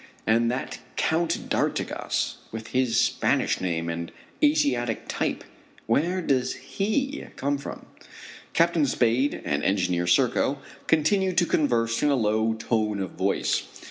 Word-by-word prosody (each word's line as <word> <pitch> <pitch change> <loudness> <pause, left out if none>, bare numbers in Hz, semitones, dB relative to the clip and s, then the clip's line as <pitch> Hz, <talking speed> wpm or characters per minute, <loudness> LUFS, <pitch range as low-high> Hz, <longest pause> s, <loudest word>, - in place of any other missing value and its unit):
And 115 +1 +3
that 125 +2 -3 0.2
Count 165 +1 0
d'Artigas, - - -1
with 110 0 -7
his 125 -2 +2
Spanish - - +1
name 85 -2 -1
and 85 0 -4 0.3
Asiatic 125 - +2
type, - - -2 0.4
where 170 +10 +1
does 130 -4 +1
he 220 - -2
come 140 +1 -1
from? - - -8 0.7
Captain 165 -3 +3
Spade 125 +2 +1
and 70 - -1
Engineer 90 -3 +1
Serko 125 +8 +3 0.3
continue 185 +4 +2
to 175 0 +3
converse 115 -8 +1
in 150 - +3
a 140 - +3
low 110 -1 +1
tone 110 -2 -1
of 95 -3 -3
voice. - - 0
125 Hz, 130 wpm, -26 LUFS, 110-155 Hz, 0.7 s, And